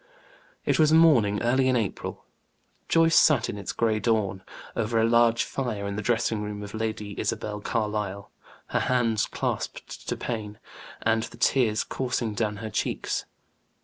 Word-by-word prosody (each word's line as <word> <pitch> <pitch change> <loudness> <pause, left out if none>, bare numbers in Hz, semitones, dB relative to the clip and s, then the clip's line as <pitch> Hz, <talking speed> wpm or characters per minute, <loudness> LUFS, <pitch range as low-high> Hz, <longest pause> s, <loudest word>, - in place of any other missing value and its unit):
It - - +2
was 155 -1 +5
a - - +6
morning 125 -12 +5
early 130 +2 +3
in 130 - +3
April. 110 -5 -3 0.6
Joyce 165 0 +4
sat, 145 -7 +5
in - - -7
its 100 - -4
gray 110 -2 +1
dawn, 105 -5 0 0.3
over 115 0 0
a 110 - +4
large 115 0 +4
fire 115 -7 -3
in 100 0 -3
the 105 - -2
dressing 115 -1 0
room 105 0 -5
of 105 - -8
Lady 110 -2 -3
Isabel 105 0 -2
Carlyle, 105 -3 -2 0.4
her - - +1
hands 115 -4 +1
clasped - - -4
to - - -1
pain, 105 -3 -4 0.5
and 115 0 +2
the - - -12
tears 115 -5 +2
coursing 125 -4 -2
down 105 0 -1
her 110 +1 -6
cheeks. - - -2
110 Hz, 160 wpm, -26 LUFS, 105-120 Hz, 0.6 s, a